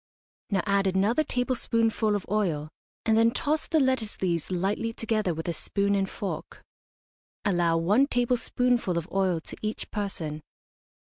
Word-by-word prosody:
Now 195 -4 +1
add 200 -1 +2
another 200 +10 +2
tablespoonful 230 -5 +1
of 205 - -3
oil, 175 -8 0 0.4
and 220 - +4
then 225 +1 +5
toss 295 +6 -1
the 320 - +3
lettuce 260 -6 0
leaves 170 -4 0
lightly 195 +5 -1
together 215 -4 0
with 160 +1 -4
a 170 - 0
spoon 200 +4 0
and 195 -1 +1
fork. 200 - -6 0.8
Allow 175 -4 +2
one 205 +12 +3
tablespoonful 245 -5 +1
of 170 - -2
oil 190 -3 +1
to - - -10
each 215 0 -4
person. 165 -7 -3
205 Hz, 145 wpm, -27 LUFS, 180-230 Hz, 0.8 s, then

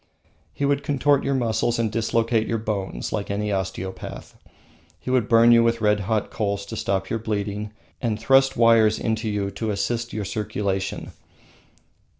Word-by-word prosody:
He 140 - -2
would 140 0 +1
contort 140 0 +2
your 140 0 0
muscles 120 -1 0
and 115 -2 0
dislocate 115 0 +1
your 115 - 0
bones 100 - -4
like 105 -2 -3
any 105 +1 -1
osteopath. 95 -1 -5 0.6
He 125 - -5
would 125 -4 +1
burn 115 0 +6
you 115 0 +6
with 115 0 +1
red 105 -1 +2
hot 105 +1 -1
coals 100 -2 -2
to - - -7
stop 95 -1 -2
your 115 - 0
bleeding, 105 -1 -3 0.3
and 115 -3 -1
thrust 135 +3 +3
wires 115 -2 +5
into 110 0 -1
you 100 -1 -2
to 110 +3 -4
assist 115 +4 -2
your 105 -2 -3
circulation. 100 -2 -3
110 Hz, 160 wpm, -23 LUFS, 100-115 Hz, 0.6 s, burn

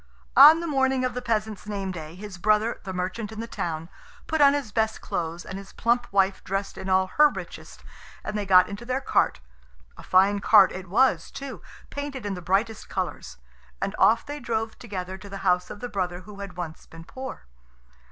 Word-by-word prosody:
On 320 +2 +9
the - - -3
morning 265 -3 +1
of 255 - -1
the 250 - -4
peasant's 220 -3 -2
name 200 -2 -3
day 160 -2 -8
his 195 -1 -9
brother, 215 +4 +2
the 190 - -4
merchant 190 +4 -3
in 220 - -8
the 230 - -3
town, 165 -7 -4 0.4
put 315 -2 0
on 280 0 +7
his 275 -7 -3
best 220 +1 0
clothes, 170 0 -4
and 190 0 -6
his 195 - -12
plump 240 +1 0
wife 195 -1 +2
dressed 195 +1 -3
in 190 0 -6
all 190 0 +4
her 300 +11 +5
richest, - - -9 0.4
and - - -4
they 205 -2 -2
got 185 -1 +7
into 205 +3 -7
their 255 +2 -1
cart 270 - +1 0.6
a - - -10
fine 195 +2 +3
cart 200 -1 +6
it 185 0 -7
was 205 -5 +3
too, 275 -1 -8 0.3
painted 285 -4 -5
in 205 - -2
the 180 - -6
brightest 195 +5 -1
colours - - -4 0.4
and 195 - -2
off 230 +1 +4
they 290 +1 -6
drove 225 -2 -2
together 190 -4 -6
to 200 +1 -11
the 195 - -6
house 180 -1 +2
of 205 - -9
the 245 - -3
brother 180 -5 -3
who 200 +2 -12
had 195 -3 -8
once 165 -3 -6
been 165 0 -12
poor. 260 - -8
205 Hz, 205 wpm, -25 LUFS, 185-235 Hz, 0.6 s, On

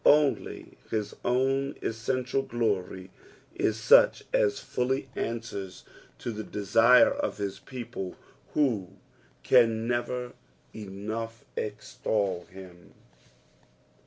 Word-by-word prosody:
Only 150 -1 +2
his 105 -2 -2
own 135 +2 +1
essential 125 +4 -1
glory 100 -7 -2 0.4
is - - 0
such - - +6
as 475 -5 +2
fully 130 +2 -1
answers 110 -5 -4 0.3
to 120 - -4
the 110 -1 -5
desire 115 +5 +5
of 285 +1 -2
his 100 -2 -3
people, 115 -7 -6 0.4
who 115 -11 +1 0.6
oui 125 -3 +7
never 120 +2 -2 0.4
enough 110 +2 -6
extol 105 -3 -2
him. 90 -2 -13
115 Hz, 95 wpm, -28 LUFS, 100-130 Hz, 0.6 s, oui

